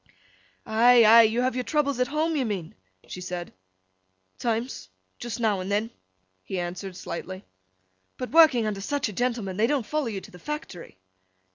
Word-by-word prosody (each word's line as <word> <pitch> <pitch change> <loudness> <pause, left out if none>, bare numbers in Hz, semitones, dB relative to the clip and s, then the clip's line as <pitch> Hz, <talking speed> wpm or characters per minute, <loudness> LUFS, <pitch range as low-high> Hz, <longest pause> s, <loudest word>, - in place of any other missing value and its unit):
'Ay, 235 +1 +5
ay! 230 +2 +9
You 225 +2 +2
have 255 +1 +1
your 250 0 -2
troubles 280 -2 0
at 250 - +2
home, 310 +3 -1
you 280 - +1
mean?' 195 -8 -4 0.3
she 180 - -8
said. 180 -1 -6 0.9
'Times. 230 - -3 0.3
Just 240 0 -5
now 215 -4 +1
and 185 +2 -5
then,' 215 +3 0 0.5
he 190 - -4
answered, 180 +1 -5
slightly. 185 +2 -7 0.7
'But, 255 - -5
working 310 -8 +6
under 205 -2 -3
such 285 +4 -1
a - - -8
gentleman, 230 -4 -2
they 220 +2 +3
don't 275 -4 0
follow 300 0 -2
you 210 -4 -3
to - - -14
the 180 - -13
Factory? 295 - -7
225 Hz, 170 wpm, -26 LUFS, 190-255 Hz, 0.9 s, ay